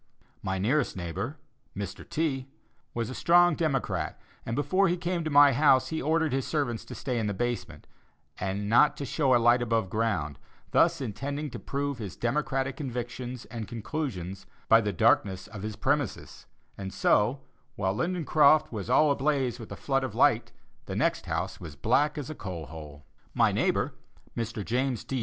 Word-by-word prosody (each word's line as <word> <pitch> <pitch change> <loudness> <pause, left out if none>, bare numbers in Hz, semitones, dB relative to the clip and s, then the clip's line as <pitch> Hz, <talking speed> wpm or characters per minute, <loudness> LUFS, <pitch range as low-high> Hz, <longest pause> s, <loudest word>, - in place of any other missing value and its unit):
My 95 0 -2
nearest 120 +5 +1
neighbor, 95 - -4 0.4
Mr. 100 -1 -6
T., 135 -5 -1 0.5
was 115 +1 -2
a - - -5
strong 175 +4 +5
Democrat, 150 -5 -1 0.3
and 115 - -1
before 185 +8 +2
he 175 0 +1
came 175 0 -2
to 155 - -2
my 145 -1 +7
house, 130 -1 +4
he 160 - -2
ordered 160 0 +1
his 135 -1 -1
servants 140 -7 -1
to - - -8
stay 125 -3 -2
in 110 - -1
the 100 - -2
basement, 120 +2 -3 0.5
and 100 +2 -2
not 120 +7 +5
to 140 - -4
show 135 -3 +2
a - - +7
light 120 +1 +4
above 115 -5 0
ground, 90 - -1 0.3
thus - - +3
intending 140 +5 -4
to - - -6
prove 140 -2 -3
his 105 -5 -6
Democratic 135 +1 -1
convictions 125 -2 -5
and 115 -2 -6
conclusions 105 - -5 0.2
by 115 0 +7
the 105 -1 -1
darkness 95 +1 +2
of 105 -2 -9
his 105 +1 -4
"premises"; 145 +1 -2 0.3
and 95 -1 -5
so, 115 +9 +2 0.3
while 95 -6 0
Lindencroft 155 - +3
was 110 -1 -5
all 150 +4 +5
ablaze 135 -3 0
with 115 - -9
a - - -4
flood 135 -1 0
of 130 -5 -4
light, - - +3 0.4
the - - -4
next - - 0
house - - -2
was 80 -4 -8
as 70 - -21
black 145 - +2
as 145 - -4
a 155 - -5
coal 90 - -6
hole. 75 -2 -10 0.3
My - - +4
neighbor, - - +1 0.4
Mr. 115 -3 -3
James 125 -1 -1
D. 135 - -3
125 Hz, 180 wpm, -28 LUFS, 105-145 Hz, 0.5 s, my